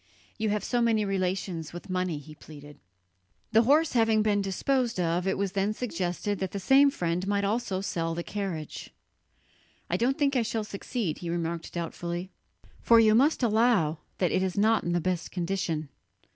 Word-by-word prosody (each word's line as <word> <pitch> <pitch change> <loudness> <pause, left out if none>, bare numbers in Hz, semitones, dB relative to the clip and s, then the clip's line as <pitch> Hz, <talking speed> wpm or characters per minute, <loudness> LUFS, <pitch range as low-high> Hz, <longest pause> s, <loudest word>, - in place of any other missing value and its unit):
"You 215 0 0
have 210 -1 -1
so 245 +1 0
many 225 -3 +2
relations 185 -4 -2
with 175 - -8
money," 185 -3 -1
he 145 +2 -11
pleaded. 145 -1 -13 0.7
The 225 - +6
horse 295 +6 +3
having 225 -2 +3
been 205 -1 +2
disposed 235 +4 0
of, 175 +1 0
it 190 - 0
was 200 -1 -1
then 200 +1 0
suggested 195 -2 -2
that 190 -2 -3
the 200 - -2
same 270 +9 +5
friend 180 -7 -2
might 200 0 +1
also 200 -2 -1
sell 165 -4 -2
the 170 - -3
carriage. 185 -8 -5 1.0
"I 180 - +2
don't 250 +6 +1
think 280 -2 +1
I 250 - +3
shall 225 -1 -2
succeed," 200 -3 -4
he 170 - -5
remarked 170 -1 -3
doubtfully, 175 +2 -4 0.5
"for 230 -1 +6
you 215 -1 +5
must 275 +4 +3
allow 215 -9 +3 0.2
that 180 -3 +1
it - - +1
is 190 +1 -2
not 220 +2 +3
in 175 - -1
the 175 - +2
best 180 0 -2
condition." 170 -4 -2
195 Hz, 180 wpm, -28 LUFS, 175-225 Hz, 1.0 s, The